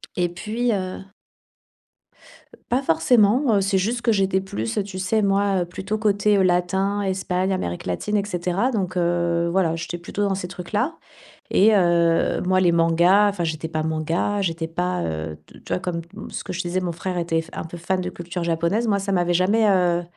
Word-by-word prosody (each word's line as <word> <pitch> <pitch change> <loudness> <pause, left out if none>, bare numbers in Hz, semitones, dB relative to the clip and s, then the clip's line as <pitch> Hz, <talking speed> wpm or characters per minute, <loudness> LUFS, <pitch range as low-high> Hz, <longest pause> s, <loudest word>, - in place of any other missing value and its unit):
Et 175 -1 +1
puis, 225 +7 -2
heu 185 -2 -3 1.7
Pas 255 +3 +2
forcément, 215 - +3
heu, 200 - +3
c'est 195 0 +1
juste 235 +5 -1
que 230 - +3
j'étais 190 -1 +1
plus, 115 - -3
tu 190 -1 -7
sais 200 +4 +1
moi, 195 -2 +2
heu, - - -1
plutôt 190 +4 -4
côté 205 -2 +2
latin, 190 +3 +1
Espagne, 190 -1 -1
Amérique 90 - -3
latine, 205 - -1
et 200 - -1
cetera. 180 +5 -1
Donc, 185 -5 -2
heu, 170 -1 +1
voilà, 170 -3 +1
j'étais 165 +1 -4
plutôt 175 +4 -5
dans 195 - 0
ces 185 -2 -4
trucs-là. 205 - -3 0.5
Et 215 +2 +5
heu, 170 -3 +2
moi, 185 +1 +2
les 175 -2 +3
mangas, 170 +5 +4
enfin 195 -3 -4
j'étais 160 0 -3
pas 155 -1 -2
manga, 165 +6 -1
j'étais 165 -2 -2
pas, 180 - -2
heu, 80 -1 -4
tu - - -16
vois, - - +1
comme 180 -2 -3 0.3
ce - - -6
que 185 - -5
je 180 - -4
te 175 - -4
disais, 185 +2 0
mon 180 -2 -2
frère 180 +2 -4
était 165 -1 0
f 165 - -16
un - - -5
peu 165 +1 -8
fan 185 +2 -1
de 180 - -3
culture 175 0 -5
japonaise. 170 +7 0
Moi, 205 -2 +2
ça 195 0 -3
m'avait 175 -2 +1
jamais, 205 +5 +3
heu 180 -3 +3
185 Hz, 195 wpm, -23 LUFS, 170-200 Hz, 1.7 s, Et